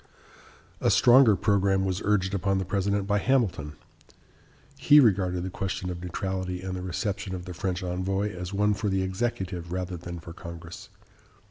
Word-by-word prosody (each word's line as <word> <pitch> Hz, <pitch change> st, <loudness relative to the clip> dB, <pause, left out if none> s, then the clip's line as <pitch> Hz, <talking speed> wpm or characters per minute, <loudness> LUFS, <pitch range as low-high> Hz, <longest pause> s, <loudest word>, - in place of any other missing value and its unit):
A -, -, +2 dB
stronger 120 Hz, -3 st, +6 dB
programme 95 Hz, -2 st, +2 dB
was 95 Hz, +1 st, -2 dB
urged 100 Hz, -2 st, +1 dB
upon 95 Hz, 0 st, 0 dB
the 95 Hz, -, -1 dB
President 100 Hz, +2 st, 0 dB
by 105 Hz, 0 st, +1 dB
Hamilton. 100 Hz, -, 0 dB, 1.1 s
He 150 Hz, 0 st, +7 dB
regarded 95 Hz, -7 st, +3 dB
the 95 Hz, -, -4 dB
question 95 Hz, -1 st, -3 dB
of 85 Hz, -1 st, -7 dB
neutrality 90 Hz, 0 st, -4 dB
and 95 Hz, -1 st, -4 dB
the 90 Hz, -, -5 dB
reception 95 Hz, +1 st, -3 dB
of 90 Hz, -1 st, -7 dB
the 90 Hz, -, -7 dB
French 95 Hz, 0 st, -3 dB
envoy 95 Hz, +3 st, -2 dB
as 90 Hz, +1 st, -6 dB
one 105 Hz, +1 st, +2 dB
for 105 Hz, 0 st, -2 dB
the 95 Hz, -1 st, 0 dB
executive 95 Hz, -4 st, -3 dB
rather 90 Hz, 0 st, -3 dB
than 85 Hz, 0 st, -7 dB
for 85 Hz, +1 st, -10 dB
Congress. 85 Hz, 0 st, -10 dB
95 Hz, 165 wpm, -27 LUFS, 90-100 Hz, 1.1 s, He